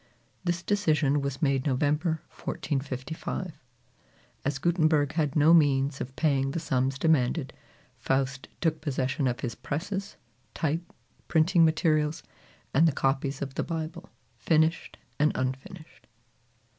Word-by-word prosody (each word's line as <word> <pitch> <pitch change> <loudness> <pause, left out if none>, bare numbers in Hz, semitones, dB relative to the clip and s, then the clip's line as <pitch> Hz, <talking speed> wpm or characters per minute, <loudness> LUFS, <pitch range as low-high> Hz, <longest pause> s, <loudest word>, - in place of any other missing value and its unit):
This 175 -1 -1
decision 155 -8 +2
was 140 +2 -3
made 135 -1 +2
November 150 +4 0
1455. 145 +5 -4 0.9
As 140 0 -1
Gutenberg 155 -2 +2
had 150 -4 0
no 155 +2 +6
means 140 -3 +3
of 130 +1 -6
paying 135 -4 +1
the 155 - -2
sums 130 -2 0
demanded, 145 -2 +1 0.5
Faust 135 0 -1
took 160 -2 0
possession 135 -1 -1
of 125 -1 -2
his 120 -3 -3
presses, 195 +6 -4 0.4
type, 165 +2 -2 0.4
printing 170 +2 +4
materials, 155 -1 +2 0.5
and 160 +5 +5
the - - +3
copies 135 +1 -1
of 135 -1 -6
the - - -1
Bible, 165 +2 -5 0.3
finished 160 +1 +1 0.2
and 150 +1 +4
unfinished. 130 +6 -5
150 Hz, 120 wpm, -28 LUFS, 135-165 Hz, 0.9 s, no